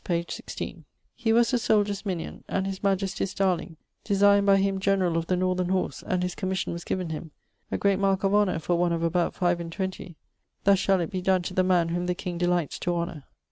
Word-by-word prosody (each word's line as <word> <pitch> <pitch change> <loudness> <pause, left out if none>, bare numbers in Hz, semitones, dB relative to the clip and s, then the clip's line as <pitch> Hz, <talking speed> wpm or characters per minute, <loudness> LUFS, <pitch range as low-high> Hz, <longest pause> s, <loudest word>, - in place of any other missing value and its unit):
page 170 -1 -2
16: - - -7 0.3
'He 230 -2 -1
was 235 +2 +4
the 250 - +2
souldiers' 205 -2 +1
mignion, 175 -4 -4
and 190 - -1
his 195 -1 -4
majestie's 195 0 -1
darling, 185 -3 0 0.3
designed 200 0 +4
by 195 0 +6
him 195 0 +1
generall 190 -3 +1
of 165 0 -1
the 180 - +1
northern 185 0 0
horse 190 0 -1
(and 180 -1 0
his 180 0 -2
commission 190 -1 -2
was 170 0 -6
given 180 -3 -3
him), 160 +1 -6 0.4
a - - 0
great 200 -1 +2
marke 195 -1 +1
of 195 0 +2
honour 205 -4 +3
for 170 +2 0
one 175 0 +1
of 165 0 -1
about 170 +1 +1
five 175 -1 +1
and 170 -1 -6
twenty: 190 -2 -5 0.5
"thus 200 -1 +5
shall 195 -1 +2
it 170 - -3
be 185 -2 -2
donne 185 -1 +2
to 185 - -5
the 185 - +2
man 180 -2 +2
whom 175 +1 -2
the 180 - 0
king 175 -2 -5
delights 175 -3 0
to 175 0 -1
honour." 170 -4 -4
185 Hz, 225 wpm, -26 LUFS, 175-195 Hz, 0.5 s, by